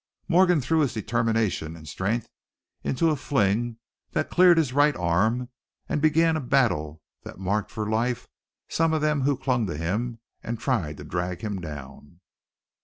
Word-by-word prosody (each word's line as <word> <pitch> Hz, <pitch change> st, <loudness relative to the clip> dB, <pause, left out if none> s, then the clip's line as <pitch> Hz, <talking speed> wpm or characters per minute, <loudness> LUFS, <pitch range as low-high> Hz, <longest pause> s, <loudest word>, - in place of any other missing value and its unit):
Morgan 180 Hz, -2 st, +4 dB
threw 160 Hz, +5 st, +1 dB
his 140 Hz, -5 st, +1 dB
determination 110 Hz, -7 st, 0 dB
and 80 Hz, -1 st, -12 dB
strength 105 Hz, +8 st, -2 dB, 0.6 s
into 160 Hz, +5 st, +1 dB
a -, -, +1 dB
fling 115 Hz, -3 st, 0 dB, 0.4 s
that -, -, -1 dB
cleared 180 Hz, -1 st, +6 dB
his 145 Hz, -6 st, +1 dB
right 145 Hz, +1 st, +4 dB
arm, 110 Hz, +9 st, +1 dB, 0.4 s
and 150 Hz, -, -1 dB
began 160 Hz, +1 st, +4 dB
a 155 Hz, -, -1 dB
battle 80 Hz, -, +1 dB, 0.2 s
that -, -, -10 dB
marked 100 Hz, +3 st, -1 dB
for 110 Hz, -2 st, -4 dB
life 115 Hz, +3 st, -1 dB, 0.4 s
some 165 Hz, 0 st, +1 dB
of 155 Hz, -, +1 dB
them 150 Hz, -2 st, +1 dB
who 140 Hz, 0 st, +1 dB
clung 125 Hz, -4 st, 0 dB
to 85 Hz, -, -4 dB
him 110 Hz, +9 st, -2 dB, 0.2 s
and 115 Hz, -1 st, -4 dB
tried 90 Hz, -, -1 dB
to -, -, -9 dB
drag 90 Hz, +3 st, -3 dB
him 105 Hz, -4 st, -3 dB
down. 75 Hz, +1 st, -9 dB
115 Hz, 165 wpm, -26 LUFS, 90-145 Hz, 0.6 s, cleared